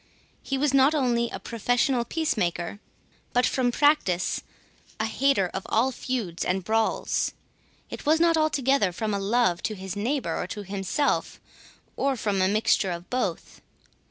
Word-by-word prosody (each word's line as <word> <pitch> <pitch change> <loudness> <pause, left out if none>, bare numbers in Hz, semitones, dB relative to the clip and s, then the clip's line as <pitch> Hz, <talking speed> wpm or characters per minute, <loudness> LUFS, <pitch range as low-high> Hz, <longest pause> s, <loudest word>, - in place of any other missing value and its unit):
He 275 - -2
was 280 0 +1
not 275 +3 +5
only 240 -4 +1
a - - -5
professional 240 +2 0
peacemaker, 205 - -1 0.5
but 245 0 +3
from 250 -2 +1
practice 240 - +2 0.6
a 220 - +1
hater 260 -2 +2
of 190 - -3
all 245 +4 +2
feuds 235 -9 -3
and 185 +1 -1
brawls. 220 +3 0 0.6
It - - -7
was 315 +2 +3
not 335 0 +4
altogether 275 - +2
from 215 +3 -2
a 200 - 0
love 195 -3 +1
to 215 - -2
his 190 0 -6
neighbour, 250 +6 -1
or - - -4
to 210 - -6
himself, 200 +9 -1 0.6
or 275 -1 0
from 205 -5 -1
a 185 - +4
mixture 205 -1 +2
of 175 0 -6
both. 250 0 -3
235 Hz, 155 wpm, -26 LUFS, 195-270 Hz, 0.6 s, not